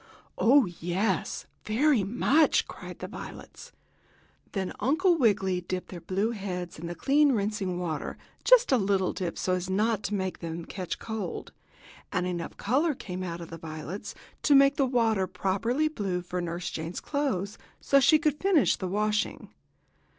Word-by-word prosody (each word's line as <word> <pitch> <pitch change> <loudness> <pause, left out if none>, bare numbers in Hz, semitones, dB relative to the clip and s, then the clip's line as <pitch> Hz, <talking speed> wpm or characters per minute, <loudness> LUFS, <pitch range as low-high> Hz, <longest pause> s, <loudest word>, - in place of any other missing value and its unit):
"Oh, 265 +4 +6
yes, 180 +3 -2 0.2
very 245 +1 +3
much!" 265 +9 +3
cried - - -9
the - - -6
violets. - - -10 0.8
Then 190 -2 -2
Uncle 345 +7 +3
Wiggily 195 - +2
dipped 180 +1 -4
their 175 -2 -8
blue 195 +6 0
heads 180 -6 -5
in 170 - -5
the 175 - -5
clean 285 - +4
rinsing 200 -4 -1
water 165 -4 -3 0.3
just - - +6
a 260 - +5
little 195 -2 +1
dip 180 -3 -4
so 185 - 0
as 180 0 -2
not 210 +2 +1
to 210 - -1
make 190 -2 -2
them 165 0 -5
catch 185 -4 -5
cold 220 -5 -5 0.6
and 180 0 0
enough 175 -2 -4
color 285 +8 +1
came 185 -6 -6
out 175 -2 -4
of 165 - -9
the 165 - -7
violets 160 +4 -7 0.3
to 290 - +5
make 275 +1 +6
the 275 -4 +2
water 225 -6 +2
properly 215 - 0
blue 195 - -2
for 180 0 -3
Nurse 175 +1 -4
Jane's 160 +2 -4
clothes, 215 -10 -2 0.2
so 275 - +4
she 310 +4 +6
could 300 -1 0
finish 370 -8 +4
the 185 - -3
washing. 210 +3 -1
195 Hz, 165 wpm, -28 LUFS, 180-255 Hz, 0.8 s, Oh